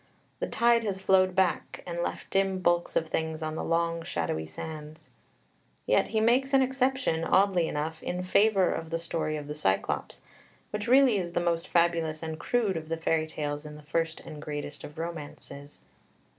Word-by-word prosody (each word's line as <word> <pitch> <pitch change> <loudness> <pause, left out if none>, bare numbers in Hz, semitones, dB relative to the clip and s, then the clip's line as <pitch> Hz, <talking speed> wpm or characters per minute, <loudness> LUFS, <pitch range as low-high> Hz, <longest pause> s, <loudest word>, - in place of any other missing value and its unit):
The - - -1
tide 235 0 +3
has 200 -3 -2
flowed 185 -1 +4
back, 190 -2 0
and 170 -1 -4
left - - -4
dim 195 -1 +2
bulks 175 -1 +1
of 165 - +1
things 160 0 -2
on 155 0 -2
the - - -3
long 165 0 0
shadowy 80 - -2
sands. 155 - -8 0.7
Yet - - +3
he 220 - 0
makes 255 +5 +3
an 265 - +6
exception, 260 -9 0
oddly 185 -1 +3
enough, 155 +2 -3
in 180 +1 -3
favour 195 0 +3
of 165 0 -5
the 165 - -1
story 165 -2 -2
of 150 - -6
the 150 - -4
Cyclops, 95 -11 -1 0.5
which 210 +2 -3
really 255 -3 +6
is 175 -2 -3
the - - +1
most 170 -1 0
fabulous 165 -2 +1
and 160 -1 -4
crude 220 -7 +1
of 160 -1 -7
the 165 - -1
fairy 160 -1 +1
tales 145 -1 -4
in 150 -1 -9
the 150 - -12
first 165 +2 -1
and 150 -1 -9
greatest 145 -1 -6
of 150 - -10
romances. 150 -3 -7
165 Hz, 185 wpm, -28 LUFS, 155-190 Hz, 0.7 s, an